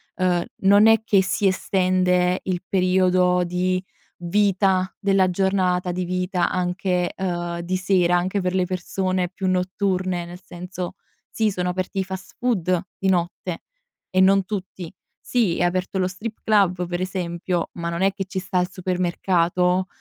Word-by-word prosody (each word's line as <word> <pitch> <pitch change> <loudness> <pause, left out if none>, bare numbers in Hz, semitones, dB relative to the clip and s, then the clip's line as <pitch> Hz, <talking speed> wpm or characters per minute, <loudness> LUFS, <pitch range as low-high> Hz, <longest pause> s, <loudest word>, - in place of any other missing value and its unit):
ehm, 180 -2 +1 0.2
non 205 +3 +6
è 225 0 +5
che 200 -3 +4
si 195 +2 +1
estende 185 -1 +2
il 180 -2 -2
periodo 180 -1 +3
di 185 +1 -1 0.4
vita 190 0 +2
della 195 -2 +3
giornata 180 -1 +1
di 180 +1 -2
vita 180 0 0
anche, 180 0 -1
uhm, 175 -2 -2
di 180 +2 -2
sera 185 -2 +2
anche 185 +3 -1
per 180 0 -1
le 185 -1 +2
persone 185 0 -1
più 190 +1 -4
notturne; 185 -1 0
nel 175 +2 -10
senso, 180 0 -7 0.3
sì, 220 -1 0
sono 180 -2 -2
aperti 185 +2 -3
i - - +1
fast 190 0 -8
food 185 -8 +1 0.2
di 195 - 0
notte 175 -1 -1 0.5
e 185 - +2
non 195 0 +4
tutti; 185 -4 -6 0.3
sì, 225 -9 0
è - - +2
aperto 180 +2 -1
lo 185 - +2
strip 215 +4 -6
club 190 -4 +2
per 175 0 -3
esempio, 180 -1 -2
ma 170 -1 -4
non 170 +1 -3
è 195 0 +3
che 195 0 -3
ci 190 0 -3
sta 185 0 -1
il 180 - -2
supermercato, 180 0 0
185 Hz, 160 wpm, -23 LUFS, 180-190 Hz, 0.5 s, non